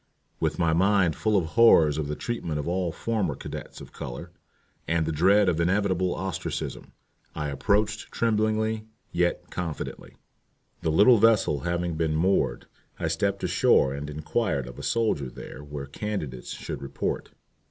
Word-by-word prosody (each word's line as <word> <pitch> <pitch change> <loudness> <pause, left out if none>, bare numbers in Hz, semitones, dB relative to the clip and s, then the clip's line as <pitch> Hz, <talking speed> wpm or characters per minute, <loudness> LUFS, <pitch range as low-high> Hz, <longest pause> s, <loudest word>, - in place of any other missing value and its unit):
With 80 -1 0
my 85 -2 +2
mind 95 -1 +3
full 110 -2 +1
of 95 - +2
the 80 - -6
horrors 80 -9 +5
of 75 - -2
the 75 - -3
treatment 85 -9 -3
of 75 - -3
all 90 0 0
former 100 -5 -1
cadets - - -8
of - - -11
color, - - -7 0.6
and 85 -1 +1
the 80 - -1
dread 95 +6 +4
of 85 -2 +2
inevitable 95 0 +1
ostracism, 95 0 -4 0.4
I 75 -1 -2
approached 105 +9 0
tremblingly 110 -1 0 0.2
yet 85 0 0
confidently. 85 -4 -5 0.7
The - - 0
little 105 +8 +6
vessel 110 -9 +4
having 85 0 -2
been 80 -1 0
moored, 80 -7 +1 0.3
I - - -1
stepped 100 -1 -1
ashore 85 -6 +3
and 70 +1 -5
inquired 75 - -1
of - - -10
a - - -6
soldier 110 - 0
there 65 +3 -10
where 75 -1 -6
candidates 70 - -5
should - - -6
report. 70 0 -3
85 Hz, 155 wpm, -26 LUFS, 75-105 Hz, 0.7 s, little